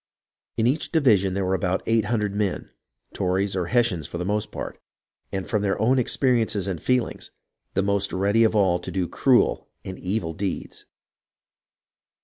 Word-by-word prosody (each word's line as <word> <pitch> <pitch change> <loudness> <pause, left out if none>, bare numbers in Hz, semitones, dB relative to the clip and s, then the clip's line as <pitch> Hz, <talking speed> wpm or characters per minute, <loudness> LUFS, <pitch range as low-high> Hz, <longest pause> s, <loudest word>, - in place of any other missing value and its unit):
In 110 - +2
each 140 +6 0
division 105 - +3
there 100 -1 0
were 95 - 0
about 95 -1 0
eight 115 -2 +2
hundred 105 -2 -1
men, 100 -2 -2 0.2
— - - -39
Tories 95 +2 0
or 90 -3 -1
Hessians 115 - +1
for - - -6
the 90 - -3
most 105 +2 -1
part, - - -7 0.2
— - - -53
and 95 -1 -3
from 105 -3 0
their 100 -1 0
own 130 +4 +3
experiences 115 -6 +1
and 90 -4 -3
feelings 125 -2 -1 0.5
the 95 - +2
most 100 0 +1
ready 100 +4 +2
of 110 0 +2
all 95 -4 +3
to - - -8
do 95 -2 -1
cruel 130 +5 +2 0.2
and 95 - -7
evil 90 -3 -2
deeds. 95 +3 -5
100 Hz, 175 wpm, -24 LUFS, 95-115 Hz, 0.5 s, division